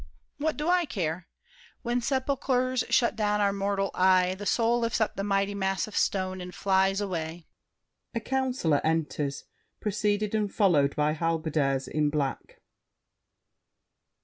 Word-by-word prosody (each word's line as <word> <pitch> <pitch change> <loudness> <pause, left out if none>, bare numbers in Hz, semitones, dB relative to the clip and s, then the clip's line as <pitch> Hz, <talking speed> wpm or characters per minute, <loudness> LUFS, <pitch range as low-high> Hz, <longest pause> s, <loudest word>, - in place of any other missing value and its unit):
What 310 +1 -1
do 300 +2 -2
I 355 -1 +3
care? 170 - -3 0.6
When 240 0 0
sepulchers 255 0 0
shut 235 -2 +3
down 210 -1 +1
our 200 -1 +2
mortal 195 0 -1
eye, 185 0 +4
The 205 +2 -6
soul 235 0 +2
lifts 230 0 0
up 220 - 0
the 195 - -3
mighty 200 0 +1
mass 195 -1 -1
of 215 - -10
stone 185 -1 0
And 180 0 -8
flies 195 0 +2
away— 170 -4 -4 0.7
[A - - +1
Councilor 255 - 0
enters, 150 -3 -1 0.4
preceded 210 0 0
and 210 -2 0
followed 155 -9 +3
by 150 0 +1
Halberdiers 155 -4 0
in 150 -1 +1
black. 145 -2 -3
195 Hz, 140 wpm, -28 LUFS, 165-230 Hz, 0.7 s, eye